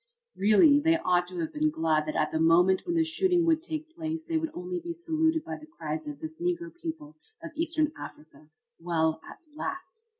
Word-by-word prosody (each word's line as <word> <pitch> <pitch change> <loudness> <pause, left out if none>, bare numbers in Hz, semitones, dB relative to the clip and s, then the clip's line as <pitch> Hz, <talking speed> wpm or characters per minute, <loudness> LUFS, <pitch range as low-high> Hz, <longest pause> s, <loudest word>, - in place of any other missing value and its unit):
Really, 215 +9 +6
they 325 +2 +3
ought 180 - +1
to 180 0 -8
have 160 - -4
been 305 +1 +2
glad 160 - +1
that 155 - -3
at 155 - +1
the 160 - -1
moment 175 - +4
when 340 - 0
the 330 - +4
shooting 350 +1 +2
would 325 -1 +3
take 320 -1 -6
place 320 -1 -4
they 325 -1 0
would 320 0 -2
only 360 0 -4
be 340 0 -5
saluted 320 -1 +1
by - - -5
the 310 - -14
cries 320 -1 -5
of 295 0 -7
this 320 +1 -7
Negro 345 -1 -2
people 320 -3 -7 0.3
of 330 - -6
Eastern 320 -1 0
Africa, 155 0 -12 0.3
"Well, 160 -2 0
at - - -11 0.2
last!" 370 +6 -6
320 Hz, 205 wpm, -28 LUFS, -, 0.3 s, Really